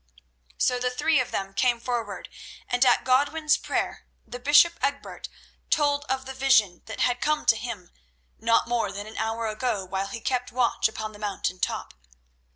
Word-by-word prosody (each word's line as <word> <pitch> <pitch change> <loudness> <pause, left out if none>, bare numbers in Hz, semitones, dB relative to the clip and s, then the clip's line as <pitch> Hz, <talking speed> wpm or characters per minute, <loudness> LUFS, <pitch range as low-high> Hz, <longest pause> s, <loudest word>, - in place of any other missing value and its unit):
So 250 -1 +2
the 250 0 0
three 275 +4 +2
of 250 -1 -1
them 195 -3 -3
came 240 +3 +2
forward 240 -1 -4 0.4
and 245 +1 +2
at 245 -2 +4
Godwin's 290 +4 +3
prayer - - -3 0.2
the 245 +2 -8
bishop 295 +6 +5
Egbert 280 0 -3 0.4
told 290 -1 +2
of 265 -1 -2
the 265 - -6
vision 230 -9 +3
that 220 - -5
had 245 0 +1
come 305 0 +1
to - - +5
him 220 -6 -6 0.5
not 230 +1 +2
more 240 -1 0
than 205 +1 -6
an 220 +1 -10
hour 225 +1 -2
ago 215 -2 -2
while 190 +1 -3
he 230 +3 -6
kept 250 +2 -2
watch 245 -1 +2
upon 220 0 -6
the 210 - -14
mountain 195 -3 -3
top. - - -3
245 Hz, 175 wpm, -26 LUFS, 220-265 Hz, 0.5 s, bishop